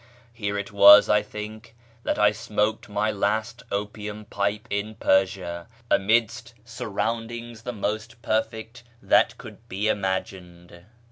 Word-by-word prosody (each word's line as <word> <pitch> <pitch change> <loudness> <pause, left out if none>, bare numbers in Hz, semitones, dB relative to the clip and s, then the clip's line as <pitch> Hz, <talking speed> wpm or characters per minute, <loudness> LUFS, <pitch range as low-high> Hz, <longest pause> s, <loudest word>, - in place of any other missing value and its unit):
Here 100 -3 -3
it 100 0 -5
was, 100 0 +8
I 105 - +4
think, 110 +2 -9 0.3
that - - -1
I 105 0 +5
smoked 105 +1 -2
my 105 +1 0
last 110 +3 -1
opium 105 +1 -4
pipe 100 +1 -2
in 105 +2 -2
Persia, 95 -3 0 0.2
amidst 115 +3 +1
surroundings 115 +1 -4
the 125 - -4
most 110 +2 -4
perfect 110 +2 -2 0.2
that - - +3
could - - -13
be 100 +3 -2
imagined. 90 -3 -4
105 Hz, 125 wpm, -25 LUFS, 100-110 Hz, 0.3 s, was